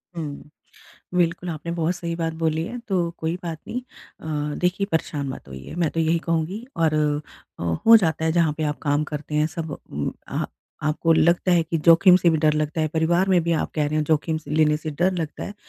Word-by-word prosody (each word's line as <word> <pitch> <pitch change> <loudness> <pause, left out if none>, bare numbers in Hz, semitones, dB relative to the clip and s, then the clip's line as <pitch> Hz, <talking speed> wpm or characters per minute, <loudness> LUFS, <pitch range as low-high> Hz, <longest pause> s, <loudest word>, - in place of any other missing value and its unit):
हुँ। 150 -3 -6 0.7
बिल्कुल 175 0 +1
आपने 165 +1 -5
बहुत 170 +1 0
सही 170 -1 -4
बात 165 -1 -1
बोली 160 0 +1
है। 245 - -6
तो 175 -4 +1
कोई 160 +2 -2
बात 165 -2 -4
नहीं। 250 - -3 0.4
अ, 150 -2 -3
देखिए 180 +3 0
परेशान 145 -3 -1
मत 130 - -8
होइए 65 - -9
मैं 170 -3 0
तो 165 - -2
यही 165 +1 +2
कहूँगी। 165 +7 -1
और 160 -2 +2 0.6
अ, - - -6 0.2
हो 230 - +10
जाता 160 -6 +1
है, 160 - +2
जहाँ 165 -2 +3
पे 155 - -3
आप 150 0 -2
काम 145 0 +1
करते 150 0 -6
हैं 150 0 +3
सब 160 -2 -5
उम, - - -3 0.2
आह, - - -2 0.4
आपको 165 +2 +2
लगता 170 +3 +3
है 170 -2 +4
कि 165 0 -2
जोखिम 170 +2 +8
से 175 -2 +3
भी 160 - +2
डर 155 - +5
लगता 155 +1 -1
है, 155 - +1
परिवार 170 +4 +1
में 185 -2 +4
भी 170 - +1
आप 160 - -1
कह 150 -2 +1
रहे 150 - -3
हैं 155 - +1
जोखिम 160 +1 +1
से 155 - -12
लेने 150 0 +3
से 155 0 -5
डर 175 +6 +1
लगता 160 -3 -4
है। 205 - -7
160 Hz, 225 wpm, -23 LUFS, 155-170 Hz, 0.7 s, हो